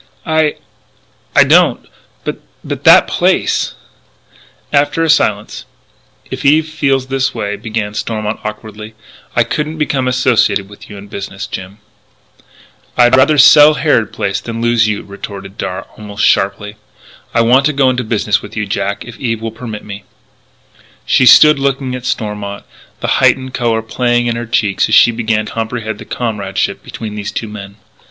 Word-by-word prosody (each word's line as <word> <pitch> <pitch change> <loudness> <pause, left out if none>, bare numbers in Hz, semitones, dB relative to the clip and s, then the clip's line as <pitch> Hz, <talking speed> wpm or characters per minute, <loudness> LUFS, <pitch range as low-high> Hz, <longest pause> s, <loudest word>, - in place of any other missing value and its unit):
"I 160 -2 +1 0.9
don't. - - +3 0.4
But - - -4 0.2
but - - -6
that - - +8
place - - 0 0.4
" - - -29
After 165 +2 -3
a 160 - +3
silence: 110 -4 0 0.7
"If 130 +1 -5
Eve 155 +3 +3
feels 135 -4 0
that 135 -1 -1
way," 105 -2 -3
began 110 -2 -4
Stormont 110 0 -3
awkwardly, 105 0 -8 0.4
"I - - +4
couldn't 150 +1 -3
become 140 -4 -1
associated 125 -6 +1
with 105 +1 -14
you 105 - -9
in 100 +1 -11
business, 100 0 -7
Jim 95 +2 -8 0.6
" - - -29
"I'd 120 +1 +5
rather 140 +3 +4
sell 150 +2 +7
Harrod 140 -8 +1
Place 100 +1 -2
than 115 -1 -6
lose 120 -1 +2
you!" 105 -1 -2
retorted 100 0 -9
Darragh 95 -2 -5
almost 105 -1 -3
sharply. 100 +2 0 0.6
"I 115 - +4
want 130 +5 +4
to - - 0
go 140 -2 +2
into 125 0 -2
business 105 -2 0
with 105 +1 -11
you, 105 - -1
Jack 100 0 -3
if 115 -1 -11
Eve 115 -4 -2
will 115 0 -5
permit 110 -2 -8
me 100 -1 -8 0.5
" - - -31 0.2
She 130 - +3
stood 150 +1 +7
looking 135 -1 -1
at 125 0 -5
Stormont, 105 -2 -4 0.4
the - - -2
heightened 130 -1 +2
colour 115 -3 0
playing 120 +1 0
in 120 -1 -1
her 120 0 -5
cheeks 105 -4 0
as - - +3
she 120 - +6
began 110 -2 -1
to - - -8
comprehend 110 -1 -4
the - - -10
comradeship 105 -5 -3
between 110 -2 -7
these 105 -1 -5
two 115 - -4
men. 100 -2 -9
115 Hz, 165 wpm, -14 LUFS, 105-130 Hz, 0.9 s, that